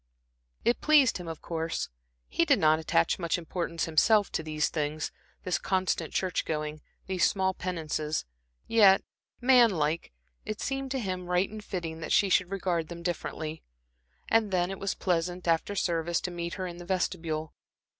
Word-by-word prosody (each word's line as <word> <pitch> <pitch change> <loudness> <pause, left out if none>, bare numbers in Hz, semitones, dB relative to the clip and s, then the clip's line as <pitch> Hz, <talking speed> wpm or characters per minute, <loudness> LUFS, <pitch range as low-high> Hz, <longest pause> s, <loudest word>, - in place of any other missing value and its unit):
It 240 - +2
pleased 290 -9 +5
him, 175 - -7
of 165 -1 -7
course. 165 -1 -2 0.4
He 335 - +1
did 285 -5 +4
not 155 0 +4
attach 150 - +1
much 170 -1 0
importance, 170 -1 -3
himself, 205 +6 +4
to - - -1
these 155 -1 0
things 150 0 -2 0.3
this 185 - 0
constant 185 -4 0
church 185 -2 0
going, 150 -1 -3 0.2
these 185 -2 +2
small 190 -1 0
penances; 160 -4 -2 0.4
yet, 200 -4 +6 0.4
manlike, 200 - +4 0.3
it 215 - -5
seemed 270 0 -2
to 265 0 -1
him 185 -5 -3
right 180 +2 +1
and 215 -1 -8
fitting 165 -5 -4
that 165 - -5
she 200 - +4
should 185 -1 +3
regard 180 -4 -1
them 170 0 -8
differently. 160 -2 -4 0.7
And 225 -2 +3
then 180 -1 +1
it 195 - -6
was 195 -1 -2
pleasant, 180 0 -1
after 165 +5 +1
service, 170 -2 0
to 180 - -3
meet 170 0 -4
her 185 - -3
in 175 -1 -6
the 175 - -9
vestibule. 165 -4 -2
175 Hz, 165 wpm, -29 LUFS, 160-195 Hz, 0.7 s, yet